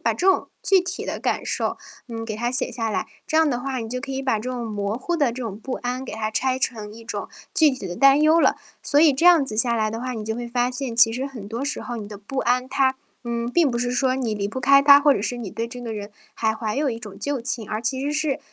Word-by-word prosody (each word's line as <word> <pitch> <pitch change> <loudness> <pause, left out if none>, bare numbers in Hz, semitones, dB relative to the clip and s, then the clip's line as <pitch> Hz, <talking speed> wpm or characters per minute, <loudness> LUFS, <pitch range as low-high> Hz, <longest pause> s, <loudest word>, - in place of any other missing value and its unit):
把 - - +1
这 375 - +1
种 - - 0 0.2
具 385 -2 +4
体 360 +1 -5
的 - - -4
感 - - -1
受， - - -1 0.3
嗯， 225 -2 -5
给 215 -2 -4
它 240 +3 -1
写 255 - 0
下 225 -2 -2
来。 - - -2 0.2
这 315 - 0
样 320 -2 +4
的 245 - -1
话 265 0 -3
你 225 -1 -5
就 255 +2 -3
可 270 +1 -6
以 265 - -3
把 260 -5 +1
这 245 +4 -5
种 245 -2 -3
模 210 0 -2
糊 345 +7 -2
的 290 -4 +3
这 255 +1 -6
种 215 -3 -5
不 260 +4 -6
安 255 +1 -3
给 - - -7
它 215 0 -2
拆 255 +4 +1
成 215 -5 -3
一 230 0 -12
种 - - -5 0.2
具 310 -2 +5
体 255 -8 -6
的 175 - -5
担 275 +2 +6
忧 315 +2 +5
了。 - - +4 0.3
所 290 - +1
以 310 -3 +6
这 330 +7 +2
样 340 -5 +7
子 215 -5 -6
下 235 +1 +3
来 215 -2 0
的 225 - -5
话， 255 +1 -3
你 220 -2 -5
就 220 +1 -3
会 240 0 -4
发 245 +1 0
现 255 -2 -4
其 230 -1 +6
实 260 +3 -2
很 230 -7 -9
多 235 +5 -3
时 285 - -3
候 240 -1 -5
你 210 -2 -6
的 210 - -8
不 210 +7 -7
安 250 +1 +1
它， 265 -1 +2 0.3
嗯， 235 0 -2
并 315 +2 +3
不 240 - -2
是 245 +1 -1
说 255 0 +1
你 245 -5 -1
离 200 -1 -1
不 260 +5 -5
开 275 +2 +6
他， 280 0 +8
或 290 -1 +5
者 200 - -1
是 245 +3 -2
你 230 -5 -6
对 225 +3 -3
这 245 +1 -9
个 230 -2 -5
人 205 -1 -6 0.2
还 220 -1 0
怀 220 0 -3
有 290 0 +1
一 230 - -2
种 210 -4 -10
旧 285 -3 -2
情， 235 -3 -4
而 215 +2 -3
其 260 +3 -1
实 285 +2 -1
是 305 -2 0
245 Hz, 315 characters per minute, -23 LUFS, 225-275 Hz, 0.3 s, 他